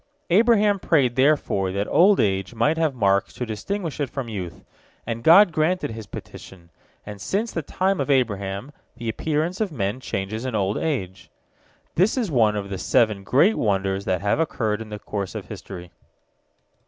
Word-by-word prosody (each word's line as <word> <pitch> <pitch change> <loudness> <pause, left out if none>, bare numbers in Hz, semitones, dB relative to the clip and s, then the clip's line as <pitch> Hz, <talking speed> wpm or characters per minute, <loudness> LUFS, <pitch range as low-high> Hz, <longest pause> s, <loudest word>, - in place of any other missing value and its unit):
Abraham 210 0 +4
prayed 135 -9 +2
therefore 130 -9 +2
that 100 +1 -1
old 195 +3 +5
age 95 +3 0
might 130 +8 +2
have 160 -4 0
marks 100 -4 +1
to 125 - -3
distinguish 160 - -4
it 140 -3 -1
from 130 -3 -5
youth, 90 -6 -6 0.4
and 115 0 -4
God 180 - +7
granted 160 -1 0
his 110 -2 -8
petition, 85 -3 -11 0.3
and 105 -1 -9
since 215 - -1
the 165 - -3
time 185 +3 -1
of 140 - -3
Abraham 105 -3 0 0.3
the 115 - -6
appearance 160 - -2
of 210 -4 -1
men 105 -3 -2
changes 110 -1 -4
in 130 -3 -3
old 100 0 0
age. 95 - -3 0.6
This 195 +9 +2
is 225 -9 -1
one 110 -6 +3
of 100 -1 -4
the 95 - -4
seven 105 -2 +2
great 145 - +3
wonders 95 -2 0
that 95 0 0
have 100 +8 +1
occurred 115 -9 -1
in 110 - -8
the 105 - -6
course 100 -2 -5
of - - -7
history. 90 -2 -9
115 Hz, 175 wpm, -23 LUFS, 100-160 Hz, 0.6 s, God